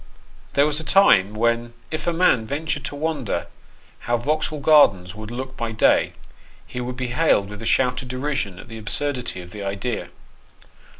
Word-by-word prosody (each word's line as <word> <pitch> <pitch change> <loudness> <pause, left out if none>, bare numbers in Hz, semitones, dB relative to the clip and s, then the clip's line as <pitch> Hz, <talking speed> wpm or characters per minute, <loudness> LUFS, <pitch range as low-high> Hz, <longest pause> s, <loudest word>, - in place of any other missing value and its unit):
THERE 140 - +4
was 150 0 +1
a - - -5
time 105 - +5
when 115 +1 0 0.2
if 155 +2 -4
a - - +3
man 165 -10 +3
ventured 150 +1 -2
to 145 - -5
wonder 145 -5 -2 0.6
how 120 - +3
Vauxhall 155 +4 -1
Gardens 100 - +5
would 110 0 -8
look 130 +2 -6
by 115 -2 -3
day, 110 - +3 0.5
he 125 - -6
was 125 0 -5
hailed 125 -5 +2
with 105 0 -9
a 115 - -4
shout 125 0 +2
of 130 - -9
derision 130 -7 -2
at - - -11
the 115 0 -8
absurdity 125 -2 -2
of 90 0 -12
the 105 0 -7
idea. 100 +4 -3
125 Hz, 175 wpm, -22 LUFS, 110-145 Hz, 0.6 s, time